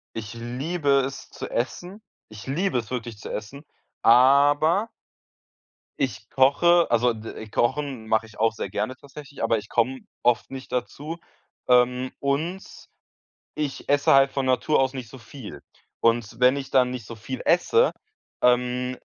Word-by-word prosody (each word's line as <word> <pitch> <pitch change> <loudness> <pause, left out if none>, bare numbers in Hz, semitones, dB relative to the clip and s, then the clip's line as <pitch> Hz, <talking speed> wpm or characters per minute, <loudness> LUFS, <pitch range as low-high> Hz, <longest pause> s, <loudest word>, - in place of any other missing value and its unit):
Ich 110 0 -6
liebe 140 +7 -3 0.2
es 135 - -7
zu - - -7
essen. 175 - -4 0.3
Ich 110 -1 -11
liebe 150 0 0
es 115 +2 -8
wirklich 120 -3 -5
zu - - -8
essen, 120 +8 -7 0.4
aber 145 - +4 1.1
ich 110 -6 -3
koche, 170 +6 +4
also 120 0 +3
d 110 0 -8
kochen 130 -1 -1
mache 110 0 +1
ich 110 -1 -16
auch 115 0 +2
sehr 100 - -5
gerne 105 +6 -3
tatsächlich, 140 -1 -10
aber 115 0 +2
ich 105 0 -8
komme 125 +3 0 0.2
oft 120 -1 +2
nicht 135 0 -8
dazu, 145 +6 -4 0.5
ähm, 125 +1 +3
und 160 +7 -1 0.9
ich 150 -3 -4
esse 145 -1 +4
halt 135 0 +5
von 135 -1 -2
Natur 130 +4 +2
aus 135 0 +1
nicht 125 -4 -7
so 130 - -11
viel. 120 +1 -11 0.4
Und 115 0 +1
wenn 125 +2 +5
ich 135 -1 -6
dann 125 -1 +3
nicht 125 -4 -6
so 115 - -8
viel 130 +4 -6
esse, 445 - +3 0.5
ähm, 125 +1 +1
130 Hz, 155 wpm, -24 LUFS, 115-140 Hz, 1.1 s, halt